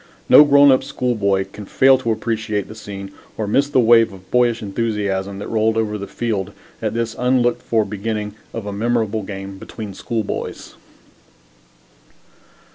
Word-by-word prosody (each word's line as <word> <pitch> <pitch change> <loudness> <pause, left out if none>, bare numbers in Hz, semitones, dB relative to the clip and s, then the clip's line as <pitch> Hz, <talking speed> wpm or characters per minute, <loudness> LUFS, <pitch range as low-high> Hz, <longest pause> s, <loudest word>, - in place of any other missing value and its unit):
No - - +9
grown 145 -1 +6
up 130 - +3
schoolboy 100 -6 0
can 105 -1 -10
fail 135 0 +4
to 115 -3 -1
appreciate 110 -2 -2
the - - -9
scene 100 -3 -8 0.3
or 110 - -2
miss 140 +7 +1
the 135 - +3
wave 115 -2 +5
of 95 -1 -15
boyish 120 -2 +2
enthusiasm 100 -2 -2
that 100 - -6
rolled 110 0 +1
over 110 -1 0
the 100 -1 -5
field 100 -2 -3 0.3
at - - -2
this 115 -1 -2
unlooked 125 -1 +2
for 110 -2 +1
beginning 105 +1 -4 0.2
of 115 -3 -6
a 100 - -4
memorable 110 0 0
game 95 -1 -7
between 105 -1 -8
schoolboys. 110 +2 -4
110 Hz, 155 wpm, -20 LUFS, 100-120 Hz, 0.3 s, No